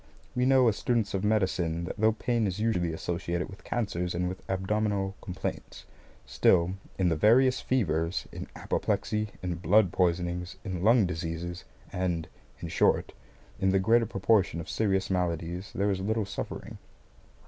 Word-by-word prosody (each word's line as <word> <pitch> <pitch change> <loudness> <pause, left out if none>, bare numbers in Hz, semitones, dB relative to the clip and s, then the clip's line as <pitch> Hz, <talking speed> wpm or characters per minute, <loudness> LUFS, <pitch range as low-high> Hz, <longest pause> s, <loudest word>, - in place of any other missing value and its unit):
We 125 +1 +2
know, 130 -2 +5
as 110 - +2
students 115 -4 0
of 95 0 -1
medicine, 95 -6 +1
that 85 - -5
though 110 +1 +3
pain 115 0 0
is 95 +1 -3
usually 90 -7 +1
associated 85 +2 -3
with 95 - -13
cancers 90 -7 -2
and 90 +1 0
with 90 +1 -5
abdominal 95 +1 0
complaints; 90 0 -6 0.4
still, 90 0 +3 0.2
in 95 -2 +2
the 80 - +1
various 125 +9 +4
fevers, 85 -9 0
in - - -7
apoplexy, 105 0 -1 0.2
in 90 -2 -2
blood 95 +1 +4
poisonings, 90 0 0
in 95 -4 -4
lung 110 +2 +5
diseases, 85 +1 -4 0.3
and, 90 -4 -1 0.3
in - - -4
short, - - +2 0.5
in 95 - +2
the 95 - +3
greater 115 +4 +3
proportion 100 -4 +2
of 80 - -7
serious 95 -3 0
maladies, 90 +1 -2
there 100 +1 +1
is 95 - -1
little 110 +2 0
suffering. - - -6
95 Hz, 155 wpm, -28 LUFS, 85-110 Hz, 0.5 s, know